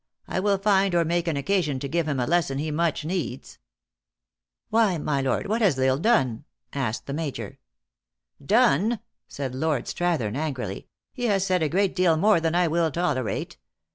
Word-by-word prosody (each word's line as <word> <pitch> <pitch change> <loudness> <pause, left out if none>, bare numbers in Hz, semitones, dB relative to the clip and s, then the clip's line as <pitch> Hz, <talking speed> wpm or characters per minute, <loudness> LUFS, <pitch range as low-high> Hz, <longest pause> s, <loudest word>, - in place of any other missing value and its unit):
I - - -2
will 200 +1 +2
find 195 -2 +2
or 170 -1 +3
make 170 +1 0
an 160 -4 0
occasion 150 -2 0
to 140 - -4
give 165 +2 -1
him 140 -3 -1
a 125 - +1
lesson 160 -4 +1
he 155 +2 -2
much 155 -1 0
needs." 165 -6 -4 0.5
" - - -62
Why, 215 -5 +3
my 145 -2 -1
lord, 135 - 0
what 220 +3 -1
has 185 -11 +3
L 130 - +1
Isle 130 0 +3
done 145 - +1
?" - - -49
asked 125 -5 -2
the 140 - -5
Major. 150 -2 -5 0.4
" - - -29
Done 230 - +3
!" - - -62
said 135 -3 -5
Lord 150 -1 -1
Strathern 155 -12 -1
angrily. 130 -10 -4
" - - -61
He 245 -2 -3
has 195 -4 +2
said 185 -2 +1
a 155 - +1
great 195 +3 +1
deal 180 -3 +3
more 205 +1 +4
than 165 0 -1
I 175 0 +3
will 165 0 +1
tolerate." 145 -7 -2
160 Hz, 200 wpm, -25 LUFS, 135-185 Hz, 0.5 s, more